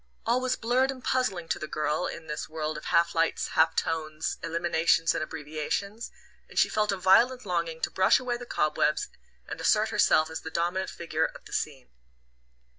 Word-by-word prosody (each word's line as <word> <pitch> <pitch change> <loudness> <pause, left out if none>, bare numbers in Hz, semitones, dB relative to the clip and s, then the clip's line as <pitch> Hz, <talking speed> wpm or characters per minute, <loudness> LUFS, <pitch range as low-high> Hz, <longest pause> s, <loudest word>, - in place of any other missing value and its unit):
All 240 +2 +2
was 255 0 0
blurred 250 +3 +1
and 260 -2 -5
puzzling 195 -10 0
to - - -1
the 155 - -5
girl 155 +2 -1
in 165 - -7
this 150 -1 -5
world 155 0 -3
of - - -8
half 170 0 +2
lights, 165 0 0
half 160 0 +3
tones, 155 -1 -2
eliminations 165 0 +2
and - - -1
abbreviations; 160 +8 -4 0.4
and - - -13
she - - +4
felt 210 -1 +1
a 195 - -1
violent 235 +7 +4
longing 170 -3 -2
to - - -1
brush 185 - +4
away 250 -1 -2
the 245 0 -10
cobwebs 150 -3 +1 0.4
and - - -6
assert - - +3
herself 155 0 +3
as 160 - -5
the 160 - -6
dominant 175 +3 -1
figure 160 -1 -1
of - - -8
the - - -11
scene. 135 -4 -3
170 Hz, 190 wpm, -28 LUFS, 155-210 Hz, 0.4 s, she